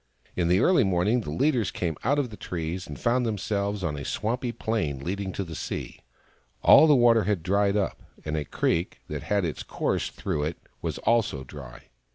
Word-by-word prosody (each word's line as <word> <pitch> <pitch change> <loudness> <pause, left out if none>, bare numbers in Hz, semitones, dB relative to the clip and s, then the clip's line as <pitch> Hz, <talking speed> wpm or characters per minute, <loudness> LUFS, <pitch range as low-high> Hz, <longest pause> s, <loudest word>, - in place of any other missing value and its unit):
In 85 -2 +1
the 90 +3 +4
early 180 -8 +5
morning 95 +5 +2
the 100 - -7
leaders 115 - +1
came 85 -3 -2
out 140 +5 +2
of 135 -5 -1
the - - -7
trees, 90 -1 -4
and 75 - -8
found 125 +1 +2
themselves 100 -2 -2
on 75 -4 -1
a 70 - -6
swampy 120 - -2
plain 110 -12 -2
leading 95 +3 -3
to 100 - -2
the 85 -3 -8
sea. - - -5 0.6
All 160 - +8
the 150 - +6
water 120 -3 +5
had 100 -6 0
dried 100 +2 +2
up, 100 - -1 0.2
and 75 0 -2
a 75 - -1
creek 85 +4 -1
that - - -4
had 100 -3 0
its 80 - -3
course - - -1
through 75 -1 -2
it 80 +2 -3 0.2
was - - -3
also 110 - +1
dry. 65 -3 -11
100 Hz, 200 wpm, -26 LUFS, 80-115 Hz, 0.6 s, All